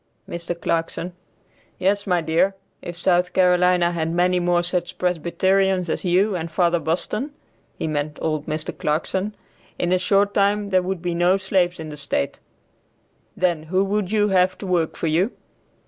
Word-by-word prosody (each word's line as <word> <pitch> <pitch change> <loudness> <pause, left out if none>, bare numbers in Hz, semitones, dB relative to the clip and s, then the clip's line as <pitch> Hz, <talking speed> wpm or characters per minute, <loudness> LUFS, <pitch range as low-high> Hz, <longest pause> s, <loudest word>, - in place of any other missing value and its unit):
Mr. 170 0 -5
Clarkson. 170 +1 -2 0.6
"Yes, 200 +2 0
my 180 -2 +2
dear, 165 +5 +1 0.3
if 175 -1 -7
South 180 0 +2
Carolina 180 -1 +4
had 165 -1 -2
many 180 +1 +2
more 175 0 +2
such 175 0 -2
Presbyterians 180 +1 +1
as - - -2
you 190 +3 +2
and 165 -1 -3
Father 175 0 +2
Boston 210 - -2 0.4
(he - - -3
meant 150 -1 -2
old 155 -2 -2
Mr. 155 0 -3
Clarkson), 190 +7 -1 0.4
in 175 - -1
a 185 - +3
short 200 +2 +2
time 205 0 +2
there 185 -1 +3
would 185 -1 -4
be 175 -1 -1
no 175 +3 +3
slaves 185 -2 0
in 160 -1 -6
the 150 - -8
state; 140 - -2 1.0
then 175 -3 +1
who 185 +5 0
would 200 -1 -1
you 210 -1 +2
have 185 -1 +3
to - - -8
work 175 -4 0
for - - -4
you?" 170 +8 +1
180 Hz, 165 wpm, -22 LUFS, 170-190 Hz, 1.0 s, Carolina